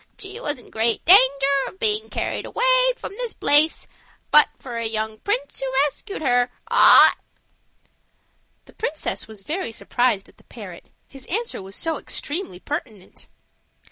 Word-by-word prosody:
She 400 +2 -7
was 300 - -2
in 245 - -17
great 225 +1 0
danger 355 -5 +10 0.4
of - - -11
being 435 +1 0
carried - - -4
away - - +3
from - - -8
this 485 -2 -5
place 300 +2 +2 0.4
but 300 - +6
for 245 -3 -8
a 230 -1 -2
young 220 0 -4
prince 285 - -3
who 270 -1 -3
rescued 390 +5 -6
her." 245 -2 +2 2.2
The - - -19
princess 315 -7 -4
was 215 -3 -12 0.3
surprised 240 -6 -1
at - - -22
the - - -23
parrot, - - -12 0.2
his 270 -2 -13
answer 455 - -3
was 190 0 -10
so 325 -2 -3
extremely 295 - -5
pertinent. 225 - -8
285 Hz, 140 wpm, -22 LUFS, -, 2.2 s, danger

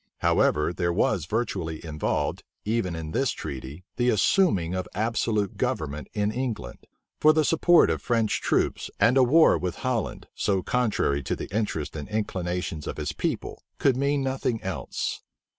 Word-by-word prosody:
However, 75 +3 +2
there 85 -1 0
was 85 -2 +1
virtually 90 -8 -2
involved, 75 -1 -1 0.2
even 105 -5 0
in 80 -1 -5
this 135 - +1
treaty, 70 +1 -6
the 125 0 +2
assuming 105 - +3
of 95 0 -2
absolute 110 -1 0
government 75 -2 -2
in 105 0 +1
England; 110 - -4 0.3
for 155 +1 +6
the 155 -1 +2
support 170 +2 +5
of - - -2
French 115 -3 +1
troops, - - 0
and 115 +3 +4
a 135 - +6
war 145 - +5
with 90 +1 -3
Holland, 125 -4 -2
so 95 -3 0
contrary 110 - +1
to - - -2
the - - -7
interests 100 -10 -2
and 75 +3 -6
inclinations 90 -6 -3
of - - -4
his - - -2
people, - - -3 0.2
could 135 -3 +3
mean 140 +1 +1
nothing 130 -3 -1
else. 95 - -3
105 Hz, 160 wpm, -26 LUFS, 85-125 Hz, 0.3 s, for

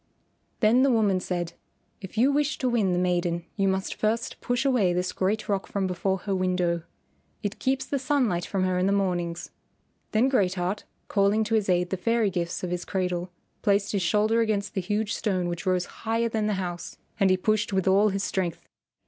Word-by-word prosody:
Then 230 +3 +5
the 275 - +4
woman 210 -6 +3
said, 175 -2 -3 0.5
"If 190 +2 -9
you 255 +5 +4
wish 295 +1 +1
to 260 - -1
win 220 -6 +2
the 175 - +1
maiden 175 -1 0
you 195 -1 +1
must 190 0 0
first 225 +2 -1
push 245 +2 0
away 230 -10 +3
this 180 +1 -1
great 205 +3 -1
rock 200 -2 -1
from 200 -1 -1
before 190 +1 0
her 200 - -2
window. 180 -2 +1 0.6
It 205 0 -3
keeps 265 0 0
the 280 - -2
sunlight 255 -11 +1
from 190 +1 -1
her 185 -1 +1
in 185 - +2
the 200 - +2
mornings." 175 -4 -1 0.6
Then 225 +4 +3
Great 195 -9 +2
Heart, 185 +3 -2 0.2
calling 200 +2 +2
to 215 +1 -3
his 215 -3 +2
aid 180 0 +2
the 190 - 0
fairy 230 +1 +1
gifts 170 0 -3
of 180 - -2
his 175 0 -2
cradle, 180 -2 -2 0.3
placed 200 0 +2
his 200 - 0
shoulder 215 +5 +2
against 210 -2 -1
the 190 - -1
huge 210 +3 -1
stone 185 -5 -1
which 175 +3 -4
rose 180 -1 +2 0.2
higher 230 +1 0
than 220 -1 0
the 210 - +1
house, 175 -2 -5 0.2
and 195 -2 +4
he 185 - +4
pushed 215 +3 0
with 190 -1 0
all 200 +3 +5
his 195 0 -2
strength. 180 -4 -2
195 Hz, 205 wpm, -26 LUFS, 180-220 Hz, 0.6 s, Then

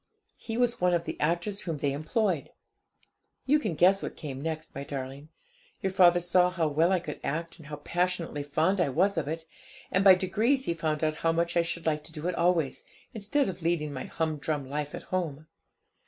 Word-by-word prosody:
He 225 -1 -5
was 245 -4 +1
one 180 -1 +4
of 170 - 0
the - - -4
actors 175 +6 0
whom 165 -4 -3
they 140 -1 0
employed. 165 - 0 1.0
'You 295 +3 +4
can 210 - -2
guess 185 +5 +5
what - - -5
came 135 -3 -6
next, 160 0 -4
my 140 - -5
darling. 140 +1 -6 0.5
Your 190 - +1
father 175 -2 +6
saw 180 +1 +3
how 170 -3 0
well 160 +5 +3
I 185 - +3
could 155 -4 -7
act, 165 +4 -2
and 155 - -12
how 150 - -5
passionately 170 0 -1
fond 160 +7 +1
I 170 - +2
was 185 +9 +2
of 160 -5 -1
it; 160 +1 -4 0.5
and 190 - +3
by 190 -1 +9
degrees 220 +9 +1
he 170 - 0
found 155 -2 -2
out 155 -1 +1
how 165 - +3
much 170 +1 0
I 170 - +5
should 170 0 -4
like 155 -2 0
to 165 - -9
do 160 +1 -5
it 180 - 0
always, 170 -4 +1 0.3
instead 225 +7 0
of 185 -2 -5
leading 160 -3 0
my 130 - -5
humdrum 155 -3 -2
life 145 +1 -3
at - - -8
home. 155 -5 -2
165 Hz, 210 wpm, -28 LUFS, 150-185 Hz, 1.0 s, by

